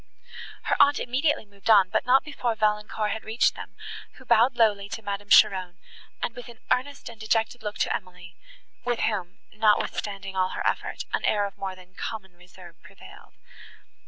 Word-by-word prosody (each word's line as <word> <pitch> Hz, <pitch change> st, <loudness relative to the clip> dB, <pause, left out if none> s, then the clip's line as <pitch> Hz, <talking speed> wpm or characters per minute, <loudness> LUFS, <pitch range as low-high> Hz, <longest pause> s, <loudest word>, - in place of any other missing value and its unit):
Her -, -, +1 dB
aunt 285 Hz, 0 st, +5 dB
immediately 265 Hz, +1 st, 0 dB
moved 200 Hz, 0 st, -9 dB
on, 195 Hz, -4 st, +6 dB
but -, -, 0 dB
not 260 Hz, +2 st, +5 dB
before 250 Hz, -6 st, -2 dB
Valancourt 210 Hz, 0 st, 0 dB
had 220 Hz, -, -4 dB
reached 220 Hz, +2 st, +2 dB
them, -, -, -10 dB, 0.4 s
who 260 Hz, -, -16 dB
bowed 240 Hz, +2 st, +4 dB
lowly 205 Hz, -4 st, +2 dB
to 225 Hz, +1 st, -6 dB
Madame 200 Hz, 0 st, -5 dB
Cheron, 190 Hz, -5 st, +5 dB, 0.5 s
and 230 Hz, -, -2 dB
with 245 Hz, -, -9 dB
an 235 Hz, -1 st, -12 dB
earnest 280 Hz, +3 st, -1 dB
and 235 Hz, -2 st, -10 dB
dejected 225 Hz, +2 st, 0 dB
look 210 Hz, -1 st, -5 dB
to -, -, +1 dB
Emily, 180 Hz, -1 st, -9 dB, 0.5 s
with 245 Hz, -1 st, -1 dB
whom, 190 Hz, -5 st, -2 dB, 0.2 s
notwithstanding 205 Hz, -2 st, 0 dB
all 185 Hz, 0 st, +1 dB
her -, -, -4 dB
effort, -, -, -1 dB
an -, -, 0 dB
air 205 Hz, -1 st, +2 dB
of 200 Hz, -, -7 dB
more 190 Hz, -1 st, -5 dB
than 185 Hz, 0 st, -17 dB
common 190 Hz, -2 st, -6 dB
reserve 175 Hz, -1 st, -16 dB
prevailed. 190 Hz, +1 st, -15 dB
210 Hz, 175 wpm, -26 LUFS, 190-235 Hz, 0.5 s, on